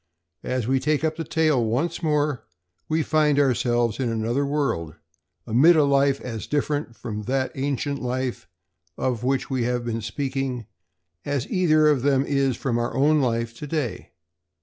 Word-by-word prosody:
As 125 -3 -2
we 135 +1 +2
take 150 +2 0
up 160 0 0
the 165 - -4
tale 155 -6 +2
once 140 +11 -1
more, 150 -6 0 0.5
we 160 0 +1
find 150 -2 +2
ourselves 120 -4 +1
in 125 -3 0
another 115 +5 -1
world, 120 - -1 0.5
amid 145 +10 +5
a 155 - +5
life 140 -1 +3
as 115 -3 -6
different 145 -4 -1
from 105 -3 -5
that 130 +1 0
ancient 140 0 -2
life 125 0 -3 0.5
of 125 -3 -1
which 135 +1 0
we 130 -2 0
have 120 0 -1
been 115 -1 -2
speaking 130 +1 -3 0.6
as 140 -3 -2
either 155 -4 +4
of 145 -4 +3
them 135 0 +2
is 135 -3 +1
from 120 -3 -1
our 120 - -2
own 150 +2 +3
life 115 -2 -1
to 150 - -6
day. 140 - -3
135 Hz, 165 wpm, -24 LUFS, 120-150 Hz, 0.6 s, amid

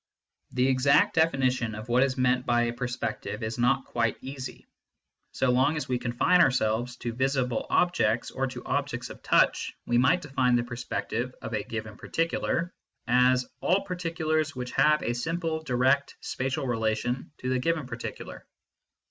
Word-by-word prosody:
The 125 +1 +1
exact 135 +1 +4
definition 130 -8 +1
of 110 +2 -8
what 120 +1 +3
is 135 -1 +1
meant 125 0 +2
by 120 -1 +2
a 120 0 -1
perspective 125 -1 -4
is 110 +2 -4
not 130 +2 +2
quite 115 -2 -1
easy. 130 -1 -7 0.7
So 130 - +1
long 130 +5 +3
as 150 - -3
we 125 -1 0
confine 125 +9 +3
ourselves 120 -4 +1
to 120 -1 -4
visible 130 -1 0
objects 120 -10 +2
or 135 0 -1
to 125 -1 -8
objects 140 -3 -2
of - - -12
touch - - +2
we 120 0 +2
might 165 +9 +3
define 130 -4 +1
the 120 - +2
perspective 120 0 -4
of - - -5
a 105 - 0
given 110 0 -6
particular 165 +1 -1 0.3
as 125 +1 +4
" - - -48
all 190 +3 +2
particulars 165 -5 -1
which 125 -1 -5
have 150 +2 +3
a 120 - 0
simple 160 +5 -2
(direct) 135 0 +1
spatial 130 +1 -3
relation 115 +1 -1
to 130 - -4
the 130 0 +1
given 160 +1 0
par 120 -1 -7
ticular." - - -7
125 Hz, 165 wpm, -27 LUFS, 120-140 Hz, 0.7 s, exact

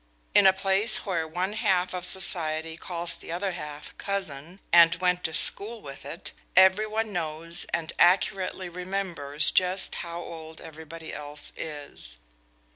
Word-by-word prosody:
In 200 -1 +7
a - - +8
place 195 +3 +2
where 170 -5 -1
one 180 +5 -2
half 190 -5 +1
of 180 -1 -2
society 160 -4 0
calls 170 0 -1
the 170 - -9
other 185 +3 -1
half 150 -4 -8
cousin, 180 -3 -4
and 170 -1 +8
went 180 0 0
to 160 - -1
school 220 +6 +2
with 140 -6 -10
it, 160 +4 -7 0.2
every 190 +3 +6
one 220 0 -2
knows 165 0 -3
and 165 -2 -2
accurately 185 +1 +3
remembers 175 -5 -1
just 185 +1 +1
how 170 0 -6
old 160 -2 -9
everybody 160 0 -9
else 145 0 -8
is. 145 - -4
175 Hz, 145 wpm, -27 LUFS, 160-190 Hz, 0.2 s, a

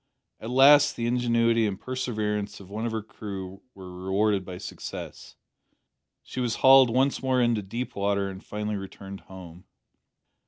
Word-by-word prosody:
At 110 - -7
last 145 +3 +6
the 115 - -3
ingenuity 115 -2 +2
and 95 -2 -4
perseverance 105 -5 -3
of 100 -1 -14
one 110 +3 -3
of - - -3
her 110 -1 -3
crew 95 -3 -8
were 90 -2 -10
rewarded 100 +1 +1
by 90 -1 -8
success. 90 -1 -8 0.9
She - - -7
was 120 -2 -1
hauled 130 -1 +8
once 130 +4 +1
more 130 -1 +1
into 120 -3 +2
deep 115 +6 -6
water 100 0 0
and 95 0 -8
finally 105 0 -4
returned 95 0 -9
home. 90 -2 -13
105 Hz, 155 wpm, -26 LUFS, 95-120 Hz, 0.9 s, hauled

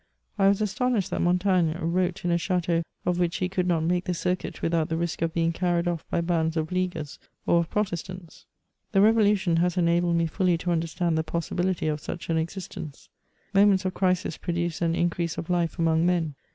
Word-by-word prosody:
I 195 - +5
was 200 +1 +3
astonished 215 -1 0
that - - -1
Montaigne 180 -2 +2
wrote 180 +2 -1
in 175 - +1
a 170 - +3
chateau 175 -2 0 0.2
of 180 0 0
which 175 -1 +1
he 185 - 0
could 180 -1 -1
not 165 -3 +1
make 175 +2 0
the 180 - -1
circuit 180 +2 -3
without 165 -1 +1
th^ 160 0 -1
risk 170 -3 -3
of 165 0 +1
being 165 0 +1
carried 175 0 0
off 170 -2 -2
by - - 0
bands 165 -1 0
of 160 +1 -2
leaguers 180 -5 -3 0.3
or 170 - +4
of 170 - -2
Protestants. 185 -3 -4 0.5
The 195 - +5
Revolution 205 -5 +4
has 175 +1 +1
enabled 170 0 +2
me 170 0 +2
fully 180 +1 +1
to 175 +2 -2
understand 165 0 0
the - - 0
possibi 170 +2 -2
lity 170 -5 0
of 150 - -5
such 170 +2 -5
an 165 - +2
existence. 160 -3 -6 0.4
Moments 195 -1 +4
of 185 - -1
crisis 180 -3 0
produce 170 -1 -2
an 165 -1 +1
increase 170 -1 -1
of 170 - -4
life 175 -1 0
among 165 0 +2
men. 170 -4 0
175 Hz, 205 wpm, -26 LUFS, 165-185 Hz, 0.5 s, I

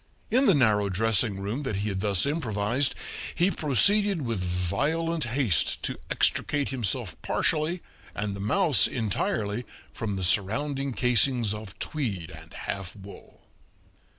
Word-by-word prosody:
In 260 +3 +4
the 195 - +6
narrow 105 -7 +3
dressing 105 +1 +1
room 105 +8 -3
that 130 -8 -3
he 100 +2 -2
had 95 -1 -3
thus 100 0 +2
improvised 125 -3 0 0.4
he 175 +3 +2
proceeded 195 - +3
with 115 -5 -2
violent 145 - -1
haste 115 - +1
to - - -1
extricate 145 -1 +1
himself 120 -7 -2
partially 160 +3 0 0.3
and 100 -1 -3
the - - -8
mouse 115 - +4
entirely 105 0 -2 0.3
from 110 -4 -3
the 95 - -3
surrounding 130 +9 0
casings 125 -2 +2
of 105 -2 -9
tweed 105 - -3
and 80 +1 -12
half 100 -2 -5
wool. 100 -1 -13
115 Hz, 135 wpm, -27 LUFS, 100-145 Hz, 0.4 s, the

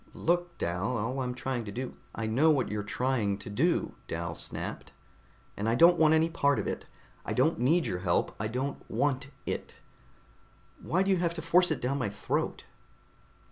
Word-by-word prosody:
"Look, 175 +1 0
Dal, 90 +8 -1
all 115 +5 -2
I'm 125 -1 -2
trying 130 -1 -2
to 100 - -6
do 125 +4 -4
" - - -19
"I 115 - -2
know 130 +9 +3
what 140 -5 +2
you're 105 0 -2
trying 105 -2 0
to 105 - -9
do," 165 +12 +1
Dal - - -3
snapped, - - -5 0.6
"and 105 +2 -1
I 115 - +2
don't 170 +7 +6
want 160 0 +6
any 160 +1 +4
part 145 -5 +2
of 105 - -1
it. - - -3 0.4
I - - -3
don't 150 +6 +2
need 155 +8 +3
your 90 - -2
help, 90 -2 0
I 110 - -1
don't 130 +5 -3
want 140 -1 0 0.2
it. - - -4 1.1
Why 185 +4 +1
do 195 - +1
you 190 - +4
have 170 -1 0
to 160 - -4
force 175 +2 +4
it 155 -5 -1
down 135 +3 0
my 125 - 0
throat?" 100 - -2
130 Hz, 195 wpm, -30 LUFS, 110-160 Hz, 1.1 s, don't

